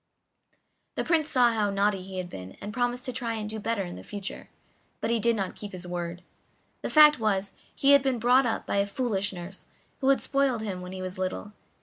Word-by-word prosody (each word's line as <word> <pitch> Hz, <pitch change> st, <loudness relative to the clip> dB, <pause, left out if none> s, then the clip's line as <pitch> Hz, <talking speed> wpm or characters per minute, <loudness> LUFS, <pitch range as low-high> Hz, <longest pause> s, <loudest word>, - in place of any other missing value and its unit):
The -, -, 0 dB
Prince 320 Hz, -3 st, +2 dB
saw 245 Hz, -3 st, +5 dB
how 210 Hz, -2 st, +1 dB
naughty 200 Hz, 0 st, +1 dB
he 190 Hz, 0 st, -8 dB
had 180 Hz, -1 st, -3 dB
been, 95 Hz, -, -9 dB
and 210 Hz, -, -6 dB
promised 245 Hz, +1 st, -1 dB
to 255 Hz, -, -3 dB
try 235 Hz, -2 st, -2 dB
and 215 Hz, -1 st, -4 dB
do 220 Hz, +1 st, -4 dB
better 225 Hz, -1 st, -1 dB
in 175 Hz, -1 st, -7 dB
future, 200 Hz, -2 st, -7 dB, 0.5 s
but 225 Hz, -, -1 dB
he 235 Hz, -, +2 dB
did 235 Hz, +1 st, +2 dB
not 195 Hz, -3 st, -2 dB
keep 205 Hz, -2 st, -8 dB
his 180 Hz, 0 st, -6 dB
word. 175 Hz, 0 st, -4 dB, 0.6 s
The -, -, -3 dB
fact 300 Hz, -2 st, +7 dB
was 200 Hz, -3 st, 0 dB, 0.2 s
he 275 Hz, -, +4 dB
had 280 Hz, 0 st, +8 dB
been 265 Hz, -2 st, 0 dB
brought 250 Hz, +3 st, +4 dB
up 225 Hz, -, -2 dB
by -, -, -1 dB
a 200 Hz, 0 st, +2 dB
foolish 200 Hz, -3 st, -1 dB
nurse, 180 Hz, +1 st, -9 dB, 0.3 s
who 270 Hz, -, +2 dB
had 275 Hz, -, +5 dB
spoiled 275 Hz, -5 st, +1 dB
him 190 Hz, -4 st, -4 dB
when 180 Hz, 0 st, -7 dB
he 185 Hz, 0 st, -6 dB
was 185 Hz, +1 st, -6 dB
little. 185 Hz, +2 st, -3 dB
210 Hz, 225 wpm, -27 LUFS, 190-245 Hz, 0.6 s, had